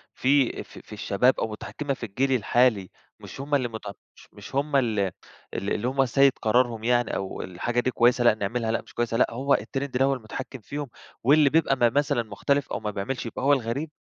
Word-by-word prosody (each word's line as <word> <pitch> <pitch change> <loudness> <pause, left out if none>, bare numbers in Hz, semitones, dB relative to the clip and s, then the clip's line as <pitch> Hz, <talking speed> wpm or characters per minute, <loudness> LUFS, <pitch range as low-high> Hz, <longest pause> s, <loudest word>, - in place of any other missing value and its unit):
في 135 -1 +2
في - - -13
في - - -13
الشباب، 105 +4 +1
أو - - 0
مُتحكمة 140 +6 -4
في 125 - -6
الجيل 130 +6 -1
الحالي، 120 -5 +2 0.3
مش - - -9
هُم 145 +1 0
اللي 130 -3 +1
مت 110 -2 -8 0.3
مش - - -17
مش 105 +5 -11
هُم 145 +1 0
ال 115 -6 +2
ال 95 -2 +1 0.6
اللي 110 +3 -1
هُم 135 +1 +2
سيد 135 +2 +4
قرارهم 115 0 +1
يعني 120 +1 +1
أو 95 -1 -4
الحاجة 115 +7 -2
دي 130 +1 0
كويسة 120 0 +3
لأ 120 -2 +5
نعملها، 110 +2 -2
لأ 115 - -1
مش - - -18
كويسة، 115 -1 -1
لأ، - - +4
هو 135 +4 +1
التريند 135 -1 -2
اللي 130 +2 +3
هو 135 - +2
المتحكم 130 +2 -7
فيهم، 140 +6 -6 0.3
واللي 145 +3 +5
بيبقى 160 -2 +3
ما 120 -2 +3
مثلًا 145 -1 +1
مختلف 130 +6 -1
أو - - -2
ما 105 -1 -3
بيعملش 105 +7 -4
يبقى 115 - -5
هو 140 +1 +5
الغريب؟ 135 +4 -2
125 Hz, 215 wpm, -25 LUFS, 110-135 Hz, 0.6 s, لأ